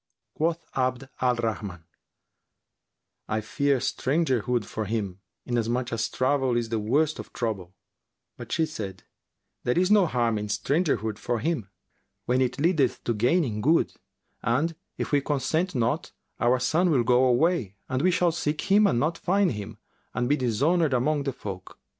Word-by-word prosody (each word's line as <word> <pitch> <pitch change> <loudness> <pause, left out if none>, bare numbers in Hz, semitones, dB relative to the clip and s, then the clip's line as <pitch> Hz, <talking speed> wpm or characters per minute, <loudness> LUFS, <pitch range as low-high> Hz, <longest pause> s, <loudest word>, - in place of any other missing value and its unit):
Quoth 165 +1 -1
Abd 130 0 -1
al 125 -1 +3
Rahman, 100 -7 -4 1.4
"I 110 - 0
fear 140 +6 +1
strangerhood 125 -5 0
for 110 +1 -4
him, 100 -3 -3 0.3
inasmuch 120 +1 -1
as 115 0 -1
travel 130 -2 +1
is 115 -1 -1
the 115 -1 0
worst 145 +9 +1
of - - -8
trouble;" 95 -6 -3 0.6
but 120 -1 -10
she 160 - +2
said, 100 -12 -7 0.6
"There 125 - +1
is 185 +2 +3
no 205 -4 +6
harm 120 -6 +1
in 105 - -4
strangerhood 110 - 0
for 120 - -1
him 140 - -2 0.6
when 125 +1 +2
it 130 0 0
leadeth 155 -5 +2
to 120 - 0
gaining 120 0 +1
good; 160 +8 +3 0.5
and, 150 +8 +1 0.2
if - - -3
we 145 -1 +3
consent 150 +5 -1
not, 125 +7 0 0.3
our 120 +2 +3
son 160 +8 +2
will 135 -7 +3
go 125 +2 +4
away 125 - +2
and 130 0 -1
we 185 - +4
shall 180 -1 +3
seek 155 -2 -2
him 205 +1 +6
and 120 - +2
not 160 +5 0
find 195 +1 +2
him 105 -4 -6 0.4
and 120 0 0
be 145 - +3
dishonoured 140 +5 +2
among 145 +3 +1
the 135 - 0
folk." 100 -7 -8
130 Hz, 160 wpm, -26 LUFS, 115-155 Hz, 1.4 s, no